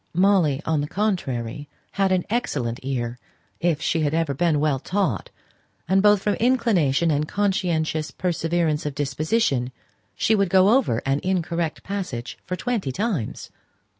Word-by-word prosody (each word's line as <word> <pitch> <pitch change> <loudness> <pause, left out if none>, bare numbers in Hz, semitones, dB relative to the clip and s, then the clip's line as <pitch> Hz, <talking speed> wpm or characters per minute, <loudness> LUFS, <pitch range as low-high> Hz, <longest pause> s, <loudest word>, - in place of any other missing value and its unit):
Molly, 175 -6 +3
on 160 -2 +1
the 145 - -3
contrary, 145 - -2 0.2
had 195 -1 +1
an 185 -1 +1
excellent 130 - -2
ear, 125 -2 -3 0.4
if 165 -3 +1
she 170 - +1
had 150 0 0
ever 165 -3 0
been 155 +1 +1
well 145 -3 +1
taught; 195 +7 -1 0.6
and 190 +1 +3
both 205 -1 +4
from 210 - +2
inclination 195 - +2
and 150 +1 0
conscientious 170 -6 0
perseverance 165 -3 -1
of 145 - -5
disposition, 145 - 0 0.4
she 220 - +2
would 200 -3 +2
go 190 +2 +5
over 220 - +2
an 135 +1 +1
incorrect 170 -3 -1
passage 180 -12 -5
for 180 - -2
twenty 220 - -2
times. 195 - -3
165 Hz, 145 wpm, -23 LUFS, 145-195 Hz, 0.6 s, go